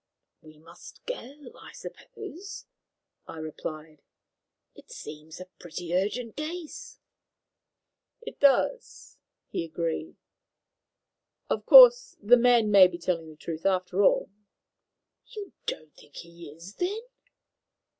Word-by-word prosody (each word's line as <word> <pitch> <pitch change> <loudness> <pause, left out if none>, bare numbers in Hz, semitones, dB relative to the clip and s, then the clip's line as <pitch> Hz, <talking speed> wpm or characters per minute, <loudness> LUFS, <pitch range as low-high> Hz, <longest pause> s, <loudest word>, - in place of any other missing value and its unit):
"We 155 -1 -17
must 155 - -16
go, 295 - -8
I - - -13
suppose," 395 -1 -10 0.6
I - - -9
replied. 155 -1 -8 0.7
"It - - -18
seems 155 +2 -10
a 185 - -8
pretty 175 0 -7
urgent 215 +5 -2
case." 340 - -7 1.2
"It 470 - -10
does," 285 - +1 0.3
he - - -3
agreed. 165 - -4 1.4
"Of - - -2
course, - - +8
the 220 +4 +6
man 240 -3 +3
may 195 -2 +8
be 175 -1 -8
telling 170 -2 -3
the 155 - -13
truth, 165 0 -7
after 185 0 0
all." 200 - +2 1.0
"You 405 -3 -8
don't 155 -1 -5
think 145 - -20
he 170 -1 -11
is, 165 +6 -13
then?" 395 +5 -2
190 Hz, 115 wpm, -27 LUFS, -, 1.4 s, course